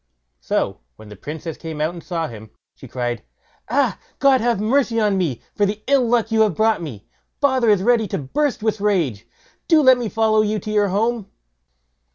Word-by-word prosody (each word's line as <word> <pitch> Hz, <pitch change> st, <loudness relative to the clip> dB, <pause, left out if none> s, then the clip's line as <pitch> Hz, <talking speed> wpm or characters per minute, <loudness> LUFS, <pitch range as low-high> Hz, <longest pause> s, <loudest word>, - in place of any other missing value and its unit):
So -, -, -2 dB, 0.2 s
when 110 Hz, -, -14 dB
the 105 Hz, -, -10 dB
Princess 155 Hz, -, -7 dB
came 160 Hz, -2 st, -7 dB
out 155 Hz, +3 st, 0 dB
and 170 Hz, -, -10 dB
saw 165 Hz, -3 st, -3 dB
him, 110 Hz, -3 st, -11 dB, 0.2 s
she -, -, -13 dB
cried, 120 Hz, -3 st, -3 dB, 0.5 s
"Ah, 255 Hz, -2 st, +1 dB, 0.2 s
God 275 Hz, -2 st, +4 dB
have 235 Hz, -3 st, +1 dB
mercy 230 Hz, +1 st, +1 dB
on 210 Hz, -2 st, +2 dB
me, 165 Hz, -11 st, -2 dB
for 205 Hz, -, -1 dB
the 205 Hz, +1 st, -1 dB
ill 270 Hz, -3 st, +3 dB
luck 230 Hz, -1 st, +1 dB
you 220 Hz, 0 st, +3 dB
have 210 Hz, -6 st, +2 dB
brought 220 Hz, +3 st, +2 dB
on -, -, -8 dB
me; 110 Hz, -10 st, -9 dB, 0.3 s
father 260 Hz, -5 st, +2 dB
is 205 Hz, -3 st, +3 dB
ready 230 Hz, -1 st, +3 dB
to -, -, -3 dB
burst 250 Hz, -, -2 dB
with 215 Hz, -2 st, -1 dB
rage; 155 Hz, -, 0 dB, 0.4 s
do 325 Hz, -2 st, +5 dB
let 260 Hz, -2 st, +6 dB
me 235 Hz, -3 st, -3 dB
follow 220 Hz, -1 st, +2 dB
you 215 Hz, 0 st, 0 dB
to 215 Hz, -, -5 dB
your 210 Hz, -1 st, +2 dB
home." 215 Hz, +2 st, -1 dB
210 Hz, 205 wpm, -21 LUFS, 165-235 Hz, 0.5 s, let